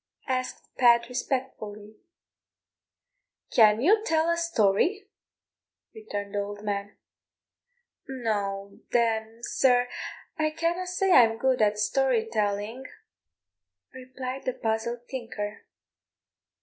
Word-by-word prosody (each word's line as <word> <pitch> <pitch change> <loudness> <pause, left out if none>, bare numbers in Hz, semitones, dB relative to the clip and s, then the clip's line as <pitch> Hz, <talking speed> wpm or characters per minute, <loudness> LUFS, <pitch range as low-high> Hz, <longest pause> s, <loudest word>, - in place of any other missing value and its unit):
asked 255 -1 -3
Pat 235 -1 +5
respectfully. 220 -5 -4 1.6
"Can 215 -1 +5
you 420 - +4
tell 325 -4 +2
a - - +2
story?" 335 - +1 0.9
returned 205 - -6
the 205 - 0
old 205 +1 -5
man. 205 -1 -3 1.1
"No, 200 -6 -3
then, 225 -1 0
sir, 250 -1 +3 0.5
I 310 0 +2
canna 340 +2 0
say 370 +1 0
I'm 225 -7 +6
good 255 0 +1
at 210 -1 +3
story 235 +1 +1
telling," 210 +3 -1 1.1
replied 255 0 -7
the 255 - 0
puzzled 235 +2 -2
tinker. 225 -5 -6
235 Hz, 95 wpm, -27 LUFS, 210-265 Hz, 1.6 s, I'm